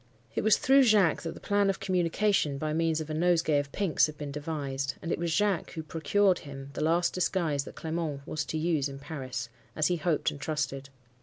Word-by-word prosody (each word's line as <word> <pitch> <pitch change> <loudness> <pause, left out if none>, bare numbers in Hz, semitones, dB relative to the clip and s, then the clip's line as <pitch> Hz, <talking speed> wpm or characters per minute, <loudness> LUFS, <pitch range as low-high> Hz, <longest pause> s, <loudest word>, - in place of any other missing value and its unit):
It - - -1
was 215 -1 +5
through 270 +1 +5
Jacques 210 - +4
that 165 - -5
the - - -10
plan 205 -1 +2
of 195 - -1
communication, 180 -4 +1
by 155 +2 -2
means 165 0 +1
of 155 0 -6
a - - -2
nosegay 165 -2 +2
of 140 -1 -4
pinks, 195 -7 +2
had 155 -1 -9
been 145 -2 -5
devised; 140 -2 -3
and 170 - -5
it - - -1
was 170 -1 -1
Jacques 200 +1 +1
who 160 - -5
procured 185 +4 +2
him 135 -1 -9
the - - -4
last 170 +3 +2
disguise 165 -6 0
that - - -10
Clement 160 -4 -3
was 155 0 -2
to 160 - -3
use 155 -3 0
in 135 - -8
Paris—as 130 -2 -4
he 175 - +1
hoped 160 -1 0
and 145 - -10
trusted. 140 -3 -3
155 Hz, 215 wpm, -29 LUFS, 145-175 Hz, -, was